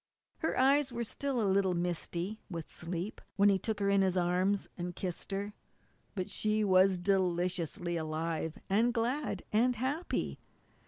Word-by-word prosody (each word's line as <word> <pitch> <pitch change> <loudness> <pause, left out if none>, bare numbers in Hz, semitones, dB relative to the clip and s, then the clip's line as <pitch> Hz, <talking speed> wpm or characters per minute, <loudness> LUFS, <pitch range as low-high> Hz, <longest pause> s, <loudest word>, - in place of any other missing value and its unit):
Her 320 - -1
eyes 270 +1 +4
were 235 0 -2
still 270 +3 -2
a 220 - +2
little 190 -1 +2
misty 175 +3 -2
with 165 -4 -6
sleep 175 +4 -4
when 200 0 +5
he 195 -1 +3
took 220 +2 -2
her 200 - +1
in 200 0 +4
his 190 -1 +2
arms 185 +3 +1
and 175 0 -5
kissed 180 +1 -4
her, 200 +1 -3 0.6
but 185 -2 -2
she 215 0 0
was 190 -1 +5
deliciously 175 -2 0
alive, 160 0 -2
and 230 +5 +2
glad, 250 +6 -1
and 245 +3 +3
happy. 275 +9 -2
195 Hz, 155 wpm, -32 LUFS, 175-220 Hz, 0.6 s, when